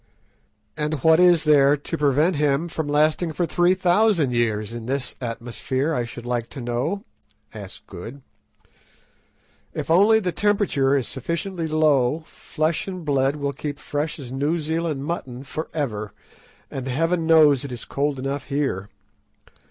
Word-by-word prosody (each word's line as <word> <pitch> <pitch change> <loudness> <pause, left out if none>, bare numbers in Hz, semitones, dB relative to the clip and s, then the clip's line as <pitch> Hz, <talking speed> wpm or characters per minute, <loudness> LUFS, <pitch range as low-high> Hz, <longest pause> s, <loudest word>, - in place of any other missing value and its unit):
"And 150 +1 -1
what 160 0 +6
is 175 -2 +5
there 145 -1 +5
to 145 +4 -5
prevent 150 +3 +2
him 145 +2 +1
from 160 -2 -4
lasting 155 +3 +2
for 175 - 0
three 175 +2 +3
thousand 185 - +3
years 110 -2 0
in 120 -1 -7
this 135 -1 -2
atmosphere, 125 +5 -2
I 120 -5 -1
should 120 0 -9
like 120 -1 -2
to 140 - -8
know?" 125 +11 -2 0.5
asked 100 -3 -10
Good. 115 +9 -9 1.5
"If - - -3
only 205 +6 +6
the 185 -4 -1
temperature 170 -9 +2
is 130 - -2
sufficiently 170 0 -3
low, 155 -2 +2
flesh 155 +2 -2
and 185 -3 -6
blood 140 -1 +2
will 140 -1 -2
keep 145 +1 -5
fresh 150 +1 -3
as 130 -5 -8
New 145 +5 0
Zealand 160 -2 -2
mutton 135 -6 -4
for 155 +3 -5
ever, 110 -9 -3 0.6
and 135 -1 -5
Heaven 165 +5 0
knows 150 -5 +6
it 140 - -6
is 120 -2 -7
cold 145 0 -1
enough 135 +1 -3
here. 135 -9 -2
145 Hz, 150 wpm, -23 LUFS, 130-165 Hz, 1.5 s, what